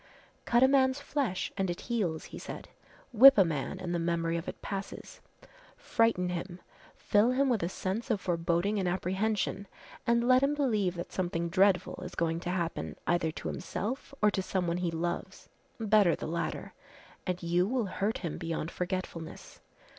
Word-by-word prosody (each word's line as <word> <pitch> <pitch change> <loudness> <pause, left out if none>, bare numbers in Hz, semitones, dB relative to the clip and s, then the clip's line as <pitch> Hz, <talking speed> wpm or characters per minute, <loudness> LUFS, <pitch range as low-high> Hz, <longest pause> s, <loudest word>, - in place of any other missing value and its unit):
"Cut 240 +1 +4
a - - +8
man's 265 0 +3
flesh 275 -10 -2
and 195 -2 -1
it 175 - -4
heals," 190 -10 -1
he - - -6
said. - - -8 0.4
"Whip 265 +3 +9
a 195 - +6
man 150 -5 -3
and 175 -1 -3
the 175 - 0
memory 165 0 0
of 170 0 -4
it - - -6
passes, 195 -1 -6 0.6
frighten 225 -6 +1
him, 180 +1 -5 0.4
fill 210 +3 +3
him 270 +1 +2
with 235 -4 +1
a 170 - -1
sense 195 +6 -3
of 220 -4 +1
foreboding 175 +3 0
and 185 - 0
apprehension 195 +2 -1 0.4
and 235 +1 +3
let 255 0 +6
him 280 +2 +2
believe 215 -11 +1
that 175 - -6
something 170 -2 -2
dreadful 190 +1 +2
is - - -8
going 165 0 0
to 175 - -5
happen 175 -2 -2
either 175 -2 +1
to - - -6
himself 245 +9 -4
or 210 - +6
to 195 - -1
someone 180 -2 -1
he 180 -1 -1
loves 175 +3 -4 0.3
better 210 -5 +4
the - - -6
latter 170 +2 -3 0.5
and 180 -1 -2
you 175 +2 +2
will 245 0 0
hurt 200 +3 -1
him 170 -4 -5
beyond 165 -1 -3
forgetfulness. 180 -2 -5
185 Hz, 175 wpm, -30 LUFS, 170-220 Hz, 0.6 s, Whip